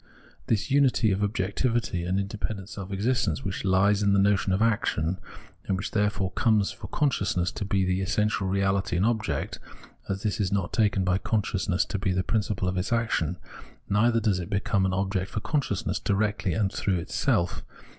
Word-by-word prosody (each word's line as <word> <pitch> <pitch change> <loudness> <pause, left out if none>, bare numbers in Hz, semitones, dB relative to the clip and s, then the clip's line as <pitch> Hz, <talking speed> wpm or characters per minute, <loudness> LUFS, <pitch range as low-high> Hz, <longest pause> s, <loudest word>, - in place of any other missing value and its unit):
This 110 +1 0
unity 135 -6 +4
of 95 +1 0
objectivity 105 -1 0
and 95 +2 0
independent 100 0 -4
self 100 -2 -7
existence 100 -4 0
which 95 -1 -3
hes 100 +2 +3
in 100 -1 +3
the 100 - +4
notion 100 0 +2
of 95 - +2
action, 95 -6 +1 0.5
and 95 - +1
which 95 - -4
therefore 105 -2 0
comes 110 -4 +2
for 100 - -9
consciousness 100 -11 0
to 105 - -4
be 95 -1 +1
the 90 +1 0
essential 105 0 0
reahty 95 -1 +1
and 95 - +2
object 110 -11 -1 0.2
— - - -23
as 100 0 -2
this 105 -1 -1
is 95 -4 0
not 100 -3 -1
taken 105 -4 +2
by 90 +1 +1
consciousness 100 -4 0
to 100 - -3
be 95 -1 0
the 95 0 0
principle 105 -3 -1
of 90 0 -1
its 90 - -2
action, 110 -8 0 0.5
neither 115 +3 +3
does 105 -4 +1
it 90 +1 -5
become 100 -1 +1
an 95 - -1
object 95 0 -1
for - - -3
con 145 +7 0
sciousness 100 -5 -3
directly 105 -2 0
and 100 0 0
through 95 -3 0
itself. 85 +1 0
100 Hz, 185 wpm, -27 LUFS, 95-105 Hz, 0.5 s, unity